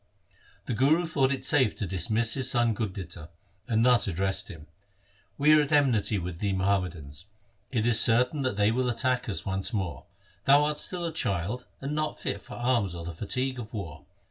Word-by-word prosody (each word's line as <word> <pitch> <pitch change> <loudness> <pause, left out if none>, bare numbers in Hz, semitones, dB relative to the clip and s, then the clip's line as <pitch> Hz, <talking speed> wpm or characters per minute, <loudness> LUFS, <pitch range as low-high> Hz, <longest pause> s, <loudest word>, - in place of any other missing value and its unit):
The - - -3
Guru 145 +9 +3
thought 140 -5 +1
it 135 - -3
safe 130 -8 +3
to 105 - -4
dismiss 110 +6 +1
his 130 -2 +2
son 120 -2 +2
Gurditta, 95 -7 -6 0.4
and 115 0 +2
thus 125 -3 +4
addressed 95 +1 -1
him: 80 -3 -11 0.4
' 100 -1 -36
We 150 +2 +5
are 155 - +6
at 145 - -3
enmity 125 -8 +2
with 90 -2 -5
the 100 -2 -1
Muhammadans. 90 -6 -2 0.4
It 115 -4 -1
is 120 -2 +5
certain 125 +5 +4
that 130 -6 -1
they 105 +1 +3
will 125 +1 0
attack 125 +1 -1
us 100 - -3
once 95 +4 -2
more. 95 -7 -4 0.4
Thou 140 +2 +6
art 150 0 0
still 180 -2 -1
a 165 - -3
child 105 - -2
and 140 +2 -4
not 155 0 -2
fit 100 - -3
for - - -11
arms 120 -7 0
or 85 -1 -7
the 85 - -6
fatigue 130 +8 -3
of 115 0 -8
war. 85 -8 -7
115 Hz, 195 wpm, -27 LUFS, 95-130 Hz, 0.4 s, are